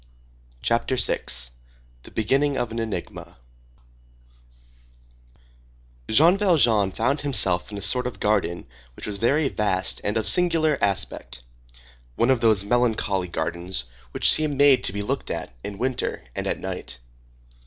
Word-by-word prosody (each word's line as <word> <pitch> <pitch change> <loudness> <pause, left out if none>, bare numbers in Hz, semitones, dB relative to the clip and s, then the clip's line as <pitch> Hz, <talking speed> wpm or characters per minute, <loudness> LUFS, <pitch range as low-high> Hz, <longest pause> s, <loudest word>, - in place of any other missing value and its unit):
CHAPTER 115 +2 0
VI—THE - - -3
BEGINNING 135 +6 0
OF 120 -2 -2
AN 115 - -4
ENIGMA 110 - -6 2.7
Jean 165 - +4
Valjean 120 - +3
found 140 +9 -1
himself 100 -10 +1
in 100 - -6
a 100 - -5
sort 125 +5 +3
of 110 -6 -8
garden 100 -5 0 0.3
which - - -7
was 105 -1 -3
very 140 +7 +1
vast 100 -6 0
and 105 +2 -1
of 110 - -2
singular 165 -5 +3
aspect; 100 -10 -2 0.7
one 120 - +2
of 125 -3 +1
those 110 -4 +3
melancholy 110 -5 0
gardens 85 -1 -3 0.3
which - - +4
seem 150 -3 0
made 140 -2 +5
to - - +1
be 100 0 -3
looked - - -3
at - - -5
in 100 -1 -7
winter 130 +3 -2
and - - -4
at - - -2
night. - - -6
110 Hz, 135 wpm, -23 LUFS, 95-130 Hz, 2.7 s, made